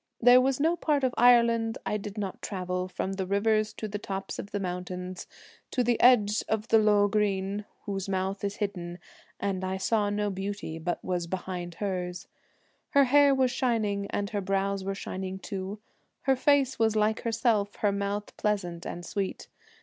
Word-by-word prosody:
There 245 +1 +7
was 265 +1 +1
no 325 +4 +3
part 295 -5 0
of 255 -1 +2
Ireland 235 -2 +4
I 210 - 0
did 210 0 -7
not 195 -3 -4
travel, 180 -2 -3
From 185 +1 -3
the 190 -1 -2
rivers 215 +2 +2
to 220 - -5
the 205 0 -4
tops 195 -1 -5
of 200 - -6
the 205 - -3
mountains, 180 0 -5 0.4
To 250 - +1
the 240 0 +1
edge 215 -4 +5
of 220 -1 0
Lough 210 -2 +5
Greine 200 -1 0 0.2
whose 195 -1 -3
mouth 190 +1 -2
is 200 0 -2
hidden, 175 -4 -4 0.4
And 195 -2 -2
I 190 0 -2
saw 205 +1 +1
no 205 0 -1
beauty 195 -4 -4
but 175 +2 -3
was 175 -2 -1
behind 180 -1 -5
hers. 180 -2 -3 0.6
Her 280 -1 +5
hair 280 +1 +5
was 260 -1 +2
shining, 220 -6 0
and 205 +1 -2
her 205 -2 -1
brows 195 0 -1
were 195 +1 -2
shining 190 -1 -5
too; 195 0 -5 0.4
Her 270 -1 +3
face 265 -1 +2
was 220 -1 +3
like 215 +1 +2
herself, 225 -3 +1
her 205 - +1
mouth 200 +1 -3
pleasant 180 -5 -2
and 175 0 -6
sweet. 195 +2 -4
205 Hz, 175 wpm, -28 LUFS, 190-225 Hz, 0.6 s, There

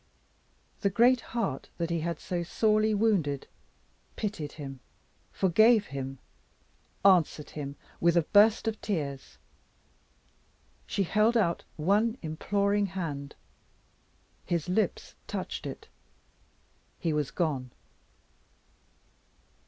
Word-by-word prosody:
The 200 - +2
great 240 +5 +4
heart 200 - -3
that 170 0 -2
he 170 - 0
had 170 0 -3
so 175 -1 -3
sorely 215 +5 +2
wounded 185 -11 +1 0.7
pitied 200 -9 -4
him, 135 -3 -8 0.5
forgave 215 +4 +4
him, 135 0 -4 0.9
answered 175 -6 +4
him 140 -2 -6 0.2
with 170 0 +3
a 170 - +4
burst 210 +6 +4
of 220 -1 -2
tears. 140 - -4 1.5
She 200 - 0
held 215 +5 +3
out 170 -6 +1
one 210 +9 +2
imploring 200 +6 0
hand. 155 -7 -5 1.1
His 170 -2 -1
lips 185 +5 -1
touched - - -4
it - - -8 1.1
he 165 -3 -1
was 150 -3 0
gone. 140 -7 -1
175 Hz, 100 wpm, -29 LUFS, 150-210 Hz, 1.5 s, great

